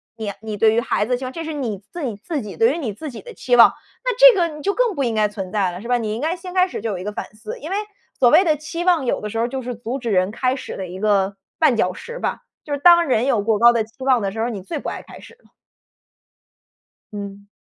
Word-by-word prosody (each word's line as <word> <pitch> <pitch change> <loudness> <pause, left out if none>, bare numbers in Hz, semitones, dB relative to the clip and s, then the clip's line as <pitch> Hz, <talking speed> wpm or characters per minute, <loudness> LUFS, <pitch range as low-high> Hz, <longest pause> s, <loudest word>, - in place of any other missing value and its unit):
你 215 -2 -4
你 220 -1 -5
对 215 +2 +4
于 230 - +3
孩 235 - 0
子 240 - -7
的 250 - +2
期 260 - -6
望， 255 - -5
这 330 - -5
是 320 - -5
你 245 -8 -3
自 345 - -6
己 230 -5 -3
自 290 - -4
己 210 - -8
对 455 +1 +4
于 - - -3
你 250 -11 -3
自 310 +9 -7
己 240 - -9
的 485 - -11
期 245 - +1
望， 235 - +8 0.3
那 - - +1
这 - - +9
个 340 - +3
你 300 - -9
就 400 +6 0
更 485 -4 +1
不 280 - 0
应 235 -3 0
该 215 -1 +2
存 195 -3 -7
在 195 -3 +1
了， 175 +2 -8
是 235 - -8
吧？ 245 - +3
你 220 -3 -3
应 230 - -5
该 325 +4 -1
先 360 +1 -9
开 365 -1 +4
始 - - -6
就 230 - -3
有 200 - -3
一 180 - -6
个 210 - -3
反 - - -5
思。 215 0 -8
因 310 - -7
为 385 - -1 0.4
所 245 - +5
谓 325 +9 +6
的 310 -3 +3
期 315 +3 -5
望， 345 -7 +3
有 - - 0
的 210 - -5
时 225 - -5
候 225 - +1
儿 - - -1
就 265 +1 -4
是 250 0 -5
阻 235 +4 -5
止 240 -3 -4
人 185 0 +2
开 255 +3 0
始 270 - -7
的 190 - -5
一 180 +2 -8
个 200 -2 +2 0.2
绊 310 -6 +4
脚 185 -4 +1
石 475 - -8
吧， - - -2 0.2
就 295 - -10
是 285 - -2
当 345 +2 +7
人 250 -3 +2
有 240 -6 +2
过 215 0 +1
高 240 +1 +7
的 230 -2 +1
期 220 - -16
望 255 -3 +4
的 195 -1 -1
时 220 - -7
候 225 - +1
儿， - - -1
你 210 -5 -5
最 185 - -5
不 - - -7
爱 - - -6
开 - - -13
始 - - -14
了。 - - -26 1.6
嗯。 200 -1 -8
235 Hz, 335 characters per minute, -21 LUFS, 210-310 Hz, 1.6 s, 这